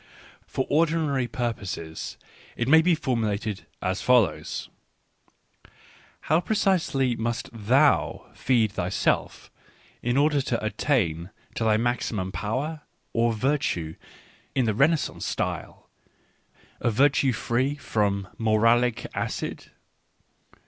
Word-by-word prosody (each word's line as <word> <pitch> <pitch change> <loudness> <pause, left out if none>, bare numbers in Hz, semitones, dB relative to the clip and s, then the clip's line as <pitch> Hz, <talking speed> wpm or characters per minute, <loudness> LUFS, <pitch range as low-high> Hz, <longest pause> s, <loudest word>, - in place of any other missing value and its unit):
For 130 - -2
ordinary 155 -4 +1
pur 120 0 -1
poses, 85 -6 -6 0.4
it 120 - -1
may 160 +3 +7
be 170 +1 +3
formulated 110 -7 -2 0.2
as 95 +1 -1
follows: 115 -11 +2 0.8
" - - -45 0.7
How 160 +3 +2
pre 220 - -1
cisely 160 - +1
must 115 +1 -3
thou 125 +7 +2
feed 115 -5 +2
thyself 90 0 -1 0.5
in 120 +2 0
order 145 0 +3
to 120 -4 -2
attain 95 - 0 0.2
to 115 - -2
thy 110 -1 +4
maximum 115 -5 -1
of - - -11
power, 145 +9 -3 0.3
or 115 0 +2
virtii 110 - -1 0.6
in 130 - +2
the 110 - +1
Renaissance 150 +8 +1
style, - - -4 0.5
— - - -33
of 115 -3 0
virtue 140 +1 +4
free 125 +4 0
fro 110 -7 0
m 100 -1 -3
moralic 115 +2 +3
acid - - -4
120 Hz, 120 wpm, -26 LUFS, 110-140 Hz, 0.8 s, may